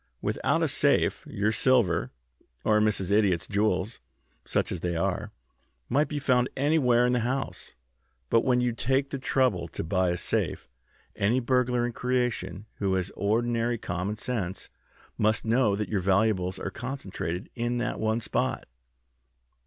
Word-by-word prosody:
Without - - 0
a - - +3
safe - - +2
your 105 +2 0
silver, 110 -7 +2 0.6
or 105 -1 +4
Mrs. 105 -3 +1
Idiot's 100 -5 +3
jewels, 105 +1 0 0.5
such - - 0
as 90 - -3
they 85 0 -2
are, 85 - -1 0.6
might 145 +5 +2
be 150 - -4
found 130 -3 +2
anywhere 130 -4 +3
in 125 - +2
the 125 - +2
house. 125 +2 -3 0.6
But 115 - +4
when 125 -1 +2
you 125 0 +1
take 135 +4 0
the 140 - -3
trouble 125 -10 +1
to - - -5
buy 90 +2 +1
a 85 - 0
safe, - - -2 0.5
any 110 +6 +2
burglar 125 -1 +1
in 120 - -2
creation 125 -5 -1
who 95 -2 +1
has 95 0 -2
ordinary 115 +3 0
common 90 +1 -3
sense 105 -6 -4 0.5
must 110 +1 +2
know 115 -2 +3
that 105 +1 -2
your 105 - 0
valuables 95 -1 +1
are 95 - -4
concentrated 95 - -5
in 120 0 -1
that 120 - -2
one 110 +1 0
spot." - - -1
110 Hz, 155 wpm, -27 LUFS, 95-125 Hz, 0.6 s, or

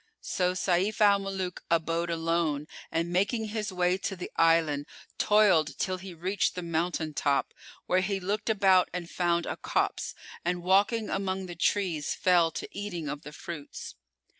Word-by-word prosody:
So 180 -1 0
Sayf 185 +3 +1
al 205 -2 +6
Muluk 190 -2 -4
abode 170 +1 +1
alone, 165 -3 0 0.3
and 165 +1 -1
making 215 +4 +1
his 210 -1 -3
way 180 0 +1
to 195 - -3
the 180 - -7
island, 160 -3 +3 0.3
toiled 185 -9 +4
till 185 -1 -1
he 190 0 -8
reached 185 +4 0
the 180 - -4
mountain 165 -1 -1
top, 140 -1 0 0.3
where 185 +1 +2
he 195 +1 -1
looked 205 +4 -2
about 195 -4 +4
and 180 -2 -4
found 170 -1 0
a - - -4
copse, - - -1 0.3
and 175 0 -1
walking 205 +4 +3
among 190 -1 -1
the 175 - -7
trees 175 -3 0
fell 175 -3 +4
to - - -6
eating 185 -6 -4
of 145 0 -4
the 150 - -9
fruits. 150 0 -8
180 Hz, 165 wpm, -29 LUFS, 165-195 Hz, 0.3 s, al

